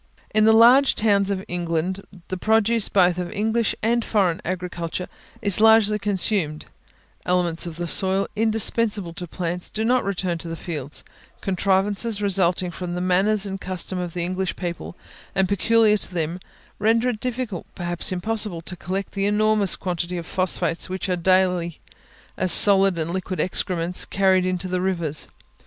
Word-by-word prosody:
In 215 0 +4
the 220 - +6
large 245 +5 +6
towns 200 -2 +2
of 195 -1 -3
England 175 +2 -2 0.3
the 185 - -2
produce 220 +2 +1
both 180 -2 +3
of 175 -1 -4
English 220 +2 0
and 235 +1 +1
foreign 190 -7 0
agriculture 180 -1 -4 0.4
is 200 0 +2
largely 220 -1 +5
consumed; 195 -6 -1 0.6
elements 175 -2 0
of 165 - -7
the 175 +1 -4
soil 190 +3 +2
indispensable 220 -3 +1
to 175 +1 -7
plants 175 +1 -4
do 220 +1 -3
not 250 +2 +2
return 185 -3 -2
to 170 - -5
the 165 - -5
fields, 150 -5 -6 0.4
contrivances 200 +3 0
resulting 185 -3 +1
from 175 0 -5
the - - -3
manners 190 +3 +1
and 195 -1 -5
customs 185 0 -3
of 175 0 -7
English 185 +2 -2
people, 175 -1 -6 0.4
and 190 0 +2
peculiar 215 +2 +3
to 195 - -4
them, 170 0 -3 0.4
render 230 +4 +2
it 225 -4 -4
difficult, 245 -7 -4
perhaps 175 -1 0
impossible, 190 -2 -1
to 180 - -7
collect 190 +3 -4
the 195 0 -1
enormous 210 -1 +2
quantity 180 -1 -3
of 170 - -6
the - - -12
phosphates 180 -2 -1
which 185 +1 -4
are 180 - +1
daily, 180 -2 +1 0.6
as 185 - +1
solid 195 0 +7
and 160 +1 -2
liquid 185 0 -4
excrements, 180 -1 -1
carried 190 -2 +2
into 185 0 -2
the 180 0 -2
rivers. 170 -5 -2
185 Hz, 160 wpm, -22 LUFS, 175-210 Hz, 0.6 s, solid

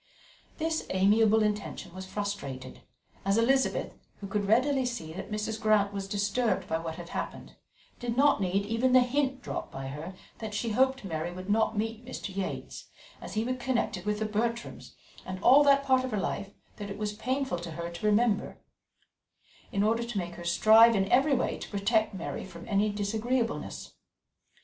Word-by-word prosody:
This 320 0 -1
amiable 215 +3 +4
intention 210 -4 -3
was 190 0 -7
frustrated, 185 -11 -5 0.4
as 195 +2 +2
Elizabeth, 265 +4 +2 0.3
who 200 - -7
could 200 0 -2
readily 260 +5 +3
see 235 -11 -4
that 180 - -7
Mrs. 215 +1 -3
Grant 210 -2 +3
was 195 -1 -4
disturbed 205 -1 0
by 160 - -1
what 165 -1 -5
had 175 0 -9
happened, - - -6 0.4
did 240 -1 -3
not 285 -5 +4
need 195 +2 0
even 230 +4 +1
the 255 - +8
hint 265 0 0
dropped - - -5
by 135 0 -6
her 155 +7 -7 0.2
that 215 -2 -5
she 230 +2 -1
hoped 265 +3 +2
Mary 165 -1 -3
would 185 +3 -5
not 220 0 +2
meet 225 +2 -2
Mr. 225 -5 -7
Yates, 195 -1 -5 0.3
as - - -8
he 215 - +1
was 255 +2 -2
connected 240 -7 -1
with 210 0 +1
the 215 - -1
Bertrams, 230 +3 -3 0.3
and 185 0 -6
all 275 +4 +8
that 275 0 +5
part 260 -2 +3
of 260 - -2
her 215 - -2
life 200 +1 -3 0.3
that 205 -1 -6
it 200 - -6
was 210 -1 -2
painful 260 -3 -2
to 170 0 -7
her 170 +1 -5
to 170 +5 -6
remember, 210 0 +2 1.1
in 200 - +1
order 225 +2 +2
to 235 -2 -5
make 175 -2 -3
her 175 - -9
strive 220 +6 +6
in 195 -1 +1
every 275 +3 +4
way 250 - -1
to - - -7
protect 215 +1 +1
Mary 175 - -5
from 175 -2 -11
any 205 +1 +2
disagreeableness. 225 +4 -2
210 Hz, 185 wpm, -29 LUFS, 195-240 Hz, 1.1 s, the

